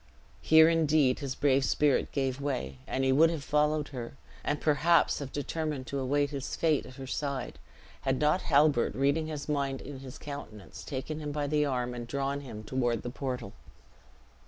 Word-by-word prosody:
Here 160 0 +7
indeed 155 -5 +3
his 135 -3 -4
brave 140 -1 +3
spirit 145 +1 +2
gave 135 -1 -1
way; 125 - -3
and 135 - -1
he 130 - +3
would 155 +5 +6
have 160 -4 -4
followed 150 +1 +1
her, 120 -4 -6 0.3
and 145 0 -1
perhaps 160 +2 +3
have 140 -2 -6
determined 150 -2 -3
to 140 +1 -3
await 145 +2 +1
his 140 -2 -4
face 155 -3 +1
at 130 - -12
her 135 -1 -7
side, 135 -1 -3 0.4
had 135 -1 0
not 150 +5 +3
Halbert, 145 -3 +3
reading 140 +4 +1
his 150 -2 -5
mind 140 -2 -1
in 140 -1 -8
his 130 -1 -9
countenance, 140 -8 -9
taken 150 +2 -4
him 150 -1 -4
by 145 0 -2
the 150 +1 +1
arm, 125 -2 -1
and 120 -1 -6
drawn 140 +2 -2
him 115 -6 -8
toward 120 -1 -1
the 120 - -4
portal. 130 -1 -4
140 Hz, 180 wpm, -30 LUFS, 130-150 Hz, 0.4 s, Here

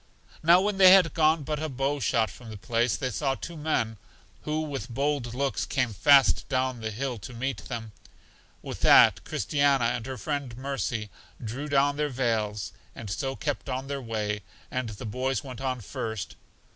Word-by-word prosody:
Now 170 +3 +6
when 200 0 -1
they 185 -1 +9
had 185 -4 +5
gone 155 -1 +3
but 150 +1 -3
a 155 - -2
bow 135 +2 -1
shot 115 -5 +1
from 120 +2 -12
the 110 - -7
place, 115 +2 0
they 130 -2 -2
saw 135 +5 0
two 170 - -8
men, 130 -8 -1 0.5
who 155 +1 -1
with 135 -6 -5
bold 135 -1 -1
looks 135 +1 -1
came 125 -4 -1
fast 135 +8 +5
down 130 -2 0
the 110 - -2
hill 125 +2 -3
to 120 +5 -9
meet 130 +3 -3
them. 115 -3 -6 0.7
With - - -6
that, - - +6
Christiana 140 -4 +1
and 115 0 -1
her 130 -1 -5
friend 130 +1 -4
Mercy, 120 -5 -3 0.3
drew 125 +7 -4
down 145 0 +3
their 150 0 0
veils, 110 -5 -1 0.2
and 105 -4 -7
so 135 +7 -2
kept 145 -1 -3
on 130 +1 -3
their 140 0 -4
way, 105 -3 -2 0.3
and 130 -2 -2
the 105 -1 -8
boys 125 +3 -1
went 130 -3 -8
on 130 -2 -2
first. 105 -1 -5
130 Hz, 185 wpm, -27 LUFS, 115-145 Hz, 0.7 s, they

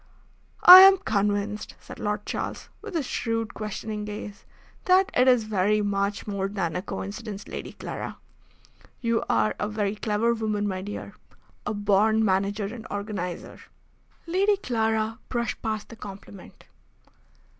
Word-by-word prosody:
"I 365 +1 +13
am 385 0 +9
convinced," 205 - -1
said - - -12
Lord 210 0 -2
Charles, - - -5
with 425 -4 -8
his 310 -5 0
shrewd, 225 -3 -2
questioning 215 0 -5
gaze, 205 -1 -8 0.4
"that 375 +1 +4
it 250 +1 +3
is 250 -3 +5
very 210 0 +1
much 200 0 -1
more 200 -2 -2
than 190 -5 -3
a - - -1
coincidence, 205 +1 -6
Lady - - -7
Clara. - - -6 0.8
You 230 -2 0
are 110 -1 +2
a 210 - -1
very 210 -1 -1
clever 220 +2 0
woman, 215 -2 -1
my 185 -2 -3
dear. 205 +2 -7 0.5
A - - -1
born 210 +2 +3
manager 200 +1 0
and 220 +2 -7
organiser." 200 -4 -5 0.7
Lady 390 +4 +2
Clara 225 - -1
brushed 235 -2 -2
past 215 -2 -3
the 230 - -10
compliment. 200 -3 -11
210 Hz, 140 wpm, -26 LUFS, 200-230 Hz, 0.8 s, I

